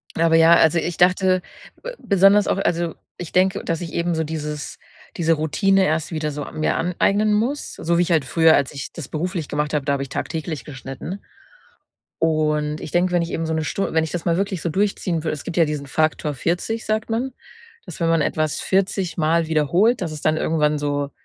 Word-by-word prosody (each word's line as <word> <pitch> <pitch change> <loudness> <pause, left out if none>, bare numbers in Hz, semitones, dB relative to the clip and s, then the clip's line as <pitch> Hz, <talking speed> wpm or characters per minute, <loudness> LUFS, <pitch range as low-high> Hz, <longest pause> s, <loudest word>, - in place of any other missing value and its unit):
Aber 165 0 +3
ja, 165 +1 +7
also, 160 +1 +4
ich 170 +1 -2
dachte 185 +1 +3 0.4
b - - -6
besonders 200 +1 +4
auch - - +1
also, 170 -3 0 0.2
ich 175 -3 -7
denke, 190 +2 +2
dass 165 +1 -2
ich 170 - -6
eben 170 +1 0
so 160 0 0
dieses 150 -2 -5 0.4
diese 165 -1 +2
Routine 165 +6 +2
erst 160 +1 -1
wieder 155 -1 -2
so 145 0 -5
an - - -8
mir 155 - +1
aneignen 200 +5 +1
muss. 240 +8 -1
So 170 +1 -1
wie 175 - +4
ich 175 - -3
halt 160 -4 +3
früher 160 +3 +4
als 140 -2 0
ich 140 -1 -7
das 160 -6 -7
beruflich 170 0 -3
gemacht 150 +1 -2
habe, 145 -3 0
da 140 - +1
habe 135 - -1
ich 135 - -8
tagtäglich 155 +1 -4
geschnitten. 135 +7 -7 1.0
Und 150 -1 0
ich - - -7
denke, 180 +2 +1
wenn 175 - +2
ich 170 - -4
eben 165 - -2
so 160 - -2
'ne 160 0 -1
Stu 195 - -2
wenn 160 - +2
ich 160 - -6
das 175 -2 -4
mal 170 -1 +1
wirklich 195 -4 -2
so 170 - -1
durchziehen 185 -3 -1
würde. 155 - -1
Es 145 - -9
gibt 175 - -4
ja 165 - +5
diesen 150 -2 -4
Faktor 155 +1 0
40, 175 - -2
sagt 220 +1 -1
man, 245 +4 -1 0.5
dass - - -10
wenn 165 - +1
man 165 -2 +3
etwas 155 0 -1
vierzigmal 170 -4 +1
wiederholt, 170 - +2
dass 165 -4 -3
es 150 - -8
dann 155 0 +2
irgendwann 150 -2 +1
so, 145 -1 -2
165 Hz, 215 wpm, -21 LUFS, 150-180 Hz, 1.0 s, ja